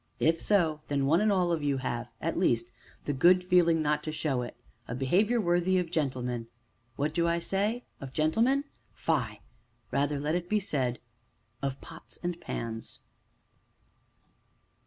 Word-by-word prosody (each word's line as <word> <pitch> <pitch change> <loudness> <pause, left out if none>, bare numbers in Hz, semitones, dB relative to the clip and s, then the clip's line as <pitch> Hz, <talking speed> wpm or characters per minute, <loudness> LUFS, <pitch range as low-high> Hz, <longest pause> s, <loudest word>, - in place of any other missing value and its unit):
If 165 +1 +2
so, 165 -7 +2
then 140 -1 0
one 160 +7 +4
and 215 0 +3
all 180 -3 +2
of 165 -2 0
you 140 -2 +1
have, 120 -3 -3
at 165 - -2
least, 120 -9 +1 0.3
the 145 - 0
good 180 +7 +5
feeling 170 -3 +4
not 150 0 +1
to 155 - -2
show 145 -5 -1
it, 120 - -7 0.3
a 115 - -4
behavior 195 - +2
worthy 175 -1 +2
of 175 -2 -1
gentlemen 125 -7 -1 0.5
what 150 +4 -1
do 170 +1 +2
I 170 0 +2
say? 205 +7 -1 0.2
of 135 -1 -7
gentlemen? 225 - +2 0.3
fie! 115 -10 -1 0.5
rather 140 +2 +1
let 150 +2 -1
it 175 0 -2
be 215 - +3
said 130 -10 -1 0.6
of 135 -1 -3
pots 165 - -10
and 175 -1 -3
pans. 115 -1 -5
155 Hz, 155 wpm, -29 LUFS, 135-180 Hz, 0.6 s, good